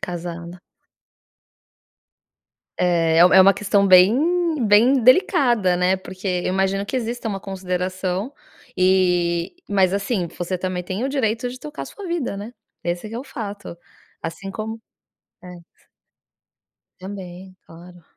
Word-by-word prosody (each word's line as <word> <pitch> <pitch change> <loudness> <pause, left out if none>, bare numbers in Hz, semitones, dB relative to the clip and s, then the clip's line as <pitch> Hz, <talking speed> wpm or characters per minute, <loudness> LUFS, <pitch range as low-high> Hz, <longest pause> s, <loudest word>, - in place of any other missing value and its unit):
Casada. 175 0 -7 2.2
É, 165 -2 +2
é 180 +2 +7
uma 195 +1 +7
questão 200 0 +1
bem, 185 +4 +6 0.5
bem 235 +6 +5
delicada, 245 - +4
né, 180 +1 +2
porque 185 +1 -10
eu 180 -2 -1
imagino 195 +1 0
que 260 - -3
exista 235 -1 -3
uma 195 -2 -3
consideração 185 +3 -3 0.4
e, 180 - +2
mas 190 -2 +2
assim, 200 -2 -1
você 180 +1 -2
também 185 0 -3
tem 190 +6 -4
o - - -1
direito 245 -3 -1
de 255 +1 -10
tocar 300 0 -7
sua 400 -2 -10
vida, 340 -11 -2
né. 210 +4 -7 0.3
Esse 175 +4 -3
que - - -8
é - - -3
o 260 - -7
fato, 205 -7 -7 0.5
assim 170 +4 -6
como 220 +3 -6 0.6
é. 180 -1 -11 1.3
também, 185 -1 -9
claro. 175 +1 -15
190 Hz, 130 wpm, -21 LUFS, 180-220 Hz, 2.2 s, é